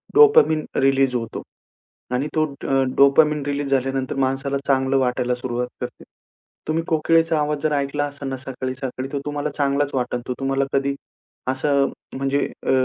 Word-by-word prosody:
Dopamine 415 - +6
release 135 -1 +3
होतो. 115 -2 -3 0.7
आणि 130 +4 0
तो 155 - +3 0.2
अ, 135 0 +3
डोपामाइन 150 +2 +5
रिलीज 145 -1 -2
झाल्यानंतर 135 -1 0
माणसाला 135 +1 -2
चांगलं 135 0 +2
वाटायला 125 -1 +1
सुरुवात 125 0 -3
करते. - - -6 0.6
तुम्ही 160 +1 +1
कोकिळेचा 165 0 +3
आवाज 150 0 0
जर 155 - +1
ऐकला 145 0 0
असेल 140 -1 -5
ना 135 - -3
सकाळी-सकाळी 130 0 -5
तो 140 - -1
तुम्हाला 145 0 -2
चांगलाच 140 0 0
वाटल 125 -1 -1
तो - - 0
तुम्हाला 135 0 +1
कधी, 140 0 +1 0.5
असं 140 +1 +2 0.3
म्हणजे 135 +1 0 0.3
अ, - - +2
140 Hz, 150 wpm, -22 LUFS, 130-145 Hz, 0.7 s, डोपामाइन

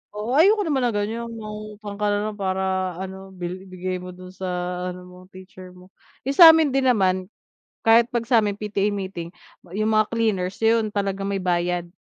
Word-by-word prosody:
Oo, 215 +4 -4
ayoko 415 +4 +5
naman 270 -7 +1
ng 225 - -2
ganyan 225 +3 -2
'no, 230 - -8
mangungutang 210 -1 -8
ka 210 - +1
na 205 0 +1
lang - - -11
para 190 -1 -1
ano, 190 +1 -7
bi 180 +2 -6
bigay 185 0 -4
mo 180 0 -9
do'n 185 0 -11
sa 190 0 -6 0.4
ano 180 0 -10
mo, 180 0 -14
teacher 185 -1 -13
mo. 180 +1 -17 0.3
'Yong 275 +2 -3
sa 335 - +12
amin 320 -4 +2
din 270 -1 +1
naman, 185 -5 +2 0.6
kahit 230 +1 +5
'pag 235 -1 -2
sa'min 220 -4 +2
PTA 205 0 -1
meeting, 185 -3 -6 0.4
'yong 215 +1 0
mga 215 -1 +3
cleaners, 200 -5 -1
'yon 225 -2 +2
talaga 195 -1 -2
may 195 -1 -2
bayad, 175 -1 -1
200 Hz, 190 wpm, -23 LUFS, 185-220 Hz, 0.6 s, sa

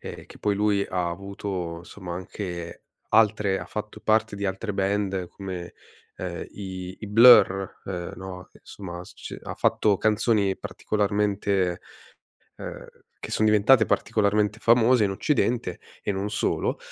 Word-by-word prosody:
ehm, - - -8
che - - -14
poi 105 -1 +1
lui 100 -1 +2
ha 90 -2 -1
avuto, 95 -2 -5
insomma, 90 0 -8
anche 90 -2 -6 0.3
altre 105 -3 +3
ha - - -7
fatto 105 0 -6
parte 110 0 +2
di 100 0 -5
altre 95 +3 -3
band 95 -2 -1
come, 90 -3 -7 0.4
uhm, 90 -2 -5
i 95 -2 -6
i 105 - -4
Blur, 105 -3 +6
uhm, 90 -2 -5
no, 95 -1 -8
insomma, 90 -3 -9
s - - -14
c - - -8
ha - - -7
fatto 105 -2 +2
canzoni 105 -2 +2
particolarmente 100 -3 0 0.8
uhm, - - -8 0.3
che - - -7
son 110 - +1
diventate 110 +3 +5
particolarmente 105 0 +1
famose 115 0 +5
in 100 - +1
occidente, 120 +3 0 0.2
e - - -2
non 100 +2 -3
solo. 105 - -1
100 Hz, 140 wpm, -25 LUFS, 95-105 Hz, 0.8 s, Blur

